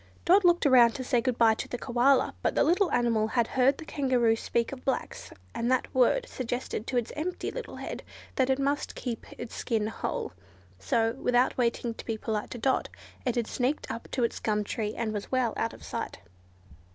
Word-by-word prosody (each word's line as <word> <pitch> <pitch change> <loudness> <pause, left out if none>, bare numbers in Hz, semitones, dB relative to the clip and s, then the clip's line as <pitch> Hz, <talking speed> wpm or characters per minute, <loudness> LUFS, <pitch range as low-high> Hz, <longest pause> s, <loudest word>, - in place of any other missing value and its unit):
Dot 385 +3 +6
looked 345 -2 +4
round 245 -4 +6
to 265 - -4
say 245 -2 +2
good 245 0 -1
bye 225 -1 +6
to - - -5
the 245 - -4
Koala, 250 +2 +3
but - - 0
the - - +4
little 360 +2 +3
animal 230 -3 +2
had 235 +1 +1
heard 265 +2 +3
the 320 - -9
Kangaroo 255 -6 +2
speak 230 +1 -1
of 265 -2 -8
blacks, 265 - -3 0.2
and 235 +1 -1
that 255 -1 +1
word 260 - +3
suggested 245 -3 -4
to 250 - -1
its 240 -2 -1
empty 335 +4 -3
little - - -6
head - - -6 0.3
that 260 -1 +2
it 265 - +3
must 280 +1 -1
keep 240 -3 -5
its 240 - -7
skin 225 -4 -1
whole, 220 - -3 0.5
so, 225 - +1
without 250 0 +2
waiting 235 -1 0
to - - -9
be 225 -2 -1
polite 215 -1 -3
to 245 - -6
Dot, 260 +3 +1 0.4
it 245 - +1
had 240 -2 +1
sneaked 255 +6 -1
up 230 - -6
its 235 -2 0
gum 210 -1 0
tree 210 0 -3
and 220 -2 -2
was 205 -1 -5
well 255 -3 +1
out 230 - -1
of - - -13
sight. - - -5
245 Hz, 205 wpm, -28 LUFS, 230-265 Hz, 0.5 s, Dot